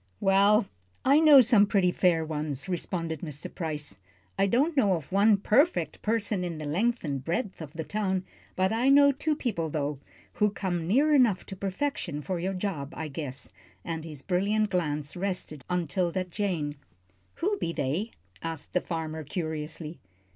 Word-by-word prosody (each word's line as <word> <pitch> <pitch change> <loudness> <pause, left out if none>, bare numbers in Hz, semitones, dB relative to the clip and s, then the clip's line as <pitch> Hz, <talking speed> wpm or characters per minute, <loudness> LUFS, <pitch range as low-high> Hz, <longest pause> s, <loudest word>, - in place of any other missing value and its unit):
"Well 200 +3 +4 0.4
I 280 +3 +6
know 300 -4 +9
some 225 -4 +5
pretty 195 -4 +3
fair 170 -3 +2
ones," 150 -3 -4
responded 170 -3 -3
Mr. 150 -3 -6
Price. 150 - -5 0.4
"I 195 - +2
don't 280 - +2
know 205 -9 +4
of 160 -3 -4
one 200 +2 +5
perfect 210 - +2
person 215 -3 0
in 170 -2 -4
the 155 - -6
length 225 +11 0
and 140 -4 -3
breadth 185 - -2
of 155 -2 -8
the 160 - -4
town. 190 -1 -1 0.3
But 185 0 +2
I 235 +4 +2
know 280 0 +7
two 300 +3 -1
people, 190 - -2
though, 145 -2 -2 0.4
who 210 - +5
come 180 -5 -3
near 285 - +4
enough 240 -9 +4
to 195 - -7
perfection 190 - -3
for 185 +1 -2
your 190 +3 -2
job, 170 -7 -3
I 155 - -4
guess," 140 -2 -6 0.3
and 160 -1 -4
his 150 -4 -8
brilliant 200 +3 +1
glance 150 -5 -1
rested 180 -6 -3
on 180 -1 0
'Tilda 175 +4 -1
Jane. 175 -6 -2 0.6
"Who 400 +4 -1
be 165 - -1
they?" 170 - -1 0.3
asked 165 -2 -6
the 180 - +2
farmer, 160 -2 -4
curiously. 155 0 -4
180 Hz, 170 wpm, -28 LUFS, 155-210 Hz, 0.6 s, know